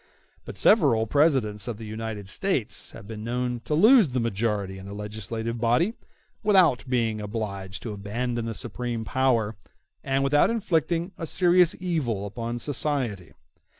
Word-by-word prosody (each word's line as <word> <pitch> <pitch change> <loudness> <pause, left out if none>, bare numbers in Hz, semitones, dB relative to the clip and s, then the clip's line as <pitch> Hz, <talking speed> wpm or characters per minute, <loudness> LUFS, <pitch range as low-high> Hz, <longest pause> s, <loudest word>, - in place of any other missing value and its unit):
But - - -8
several 110 -1 +4
Presidents 125 -6 +2
of 120 -3 -4
the 110 - -8
United 110 -2 -5
States 140 - -1
have - - -11
been 105 0 -7
known 125 +1 -2
to 150 - 0
lose 215 - +6
the 125 0 -1
majority 105 -4 -1
in 95 - -10
the 100 - -7
legislative 110 +2 -5
body 125 - +2 0.5
without 185 - +4
being 115 -4 0
obliged 100 -3 -5
to 110 - -4
abandon 115 +4 -3
the 115 -1 -4
supreme 120 0 -4
power, 115 -5 +1 0.5
and 135 0 0
without 145 +2 +4
inflicting 175 -5 0
a 165 - -3
serious 180 -1 +4
evil 145 - -1
upon 115 +3 -4
society. 125 - -2
120 Hz, 150 wpm, -26 LUFS, 105-145 Hz, 0.5 s, lose